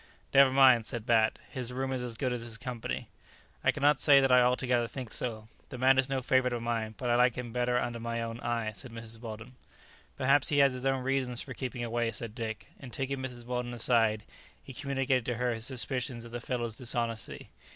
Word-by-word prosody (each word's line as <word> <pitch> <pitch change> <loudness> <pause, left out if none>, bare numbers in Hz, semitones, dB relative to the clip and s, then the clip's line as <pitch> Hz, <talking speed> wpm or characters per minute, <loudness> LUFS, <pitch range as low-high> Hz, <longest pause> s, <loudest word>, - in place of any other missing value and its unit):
"Never 140 -1 +7
mind!" 130 -4 +5
said 115 -2 -4
Bat, 115 -2 +3
"his 125 -2 -4
room 130 +1 -2
is 130 - -2
as 120 -2 -5
good 130 -1 -1
as 120 - -3
his 115 -1 -4
company." 120 -1 -5 0.6
"I - - +3
cannot 145 -1 +2
say 140 -1 +7
that 135 -1 +2
I 125 0 +7
altogether 125 -1 +2
think 125 -3 -7
so. 110 -3 -2 0.2
The 130 - -7
man 130 +1 +4
is 130 0 +2
no 135 -1 -1
favourite 130 0 +2
of 120 -1 -3
mine, 115 -2 -2
but 125 -2 -1
I - - +4
like 125 -1 +4
him 120 -2 -6
better 125 0 +1
under 120 -1 -2
my 115 0 -3
own 115 0 -4
eye," 115 -2 -2
said 115 +5 -10
Mrs. 115 0 -6
Weldon. 110 +1 -8 0.6
"Perhaps 140 +2 +3
he 145 - +1
has 140 -2 +5
his 130 +1 -2
own 135 -1 0
reasons 130 -2 -1
for 130 - -8
keeping 125 -2 -4
away," 120 0 -1
said 115 -1 -6
Dick, 110 -2 -5
and 130 -3 -10
taking 135 +4 -3
Mrs. 125 -2 -6
Weldon 125 0 -3
aside, 115 -2 +2 0.4
he 135 - -10
communicated 135 -2 0
to 125 - 0
her 125 +1 0
his 115 0 -3
suspicions 125 -2 -2
of 115 - -11
the 120 0 -5
fellow's 120 -2 -2
dishonesty. 115 -3 -2
125 Hz, 220 wpm, -30 LUFS, 115-130 Hz, 0.6 s, Never